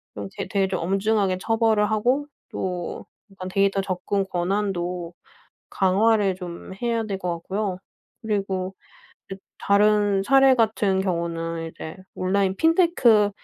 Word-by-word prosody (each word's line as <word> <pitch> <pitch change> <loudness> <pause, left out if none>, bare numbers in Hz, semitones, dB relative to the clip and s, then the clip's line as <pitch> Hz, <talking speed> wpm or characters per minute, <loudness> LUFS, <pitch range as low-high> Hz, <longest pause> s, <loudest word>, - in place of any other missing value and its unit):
좀 100 -1 -5
되 - - -4
되게 195 0 +1
좀 185 -1 -2
엄중하게 195 +1 +1
처벌을 220 -1 +2
하고 250 +7 +1 0.2
또 180 -2 -4 0.3
약간 185 -1 -8
데이터 195 +1 +1
접근 195 +1 -2
권한도 180 -2 -2 0.6
강화를 200 +1 +2
좀 180 0 -8
해야 230 -1 0
될 200 -3 -3
것 180 -2 -2
같고요. 190 +2 -3 0.5
그리고 195 -3 -2
이 - - -38 0.8
다른 205 -1 +3
사례 270 +4 +5
같은 215 -4 +1
경우는 165 -2 -2
이제 160 +1 -9 0.2
온라인 190 +1 0
핀테크 320 - +4
195 Hz, 255 characters per minute, -24 LUFS, 185-215 Hz, 0.8 s, 사례